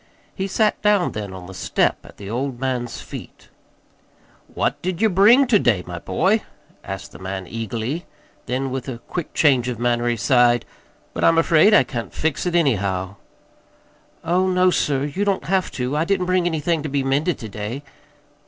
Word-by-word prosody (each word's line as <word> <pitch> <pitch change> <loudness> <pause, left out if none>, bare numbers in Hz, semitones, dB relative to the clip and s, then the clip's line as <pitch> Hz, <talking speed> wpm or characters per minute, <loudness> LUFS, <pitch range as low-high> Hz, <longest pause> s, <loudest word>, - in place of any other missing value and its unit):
He 190 - -3
sat 210 +2 +1
down 205 -3 +3
then 105 -2 -5
on 95 -1 -9
the 95 - -10
step 90 - 0
at - - -15
the 100 - -9
old 125 +3 -3
man's 125 -3 -2
feet. - - -10 1.0
"What - - -1
did 180 -1 -3
ye 220 - +4
bring 215 +8 +6
ter 235 -5 +4
day, 105 - +2
my 85 -1 -6
boy?" 195 - +1 0.4
asked 95 0 -7
the - - -12
man 95 0 -5
eagerly; 115 - -4 0.4
then 130 +1 -2
with 130 0 -4
a 125 - -5
quick 160 +8 -6
change 130 -5 +3
of 125 -2 -3
manner, 120 0 0
he 120 - +1
sighed, 120 0 +3 0.5
"but - - -3
I'm 165 - +5
afraid 165 +5 +5
I - - +6
can't 120 -4 -6
fix 160 +2 -1
it, 175 - -1
anyhow." 100 - 0 1.1
"Oh, 180 +3 +2
no, 185 0 +3
sir, 140 -5 0
you 150 +8 -2
don't 200 -2 0
have 190 +1 +1
to. 125 +2 -2
I 155 - +2
didn't 185 +1 0
bring 185 -1 +1
anything 160 0 0
to 155 - -4
be 140 0 0
mended 145 +6 0
to 110 - -7
day." 105 +7 -5
135 Hz, 185 wpm, -21 LUFS, 120-180 Hz, 1.1 s, bring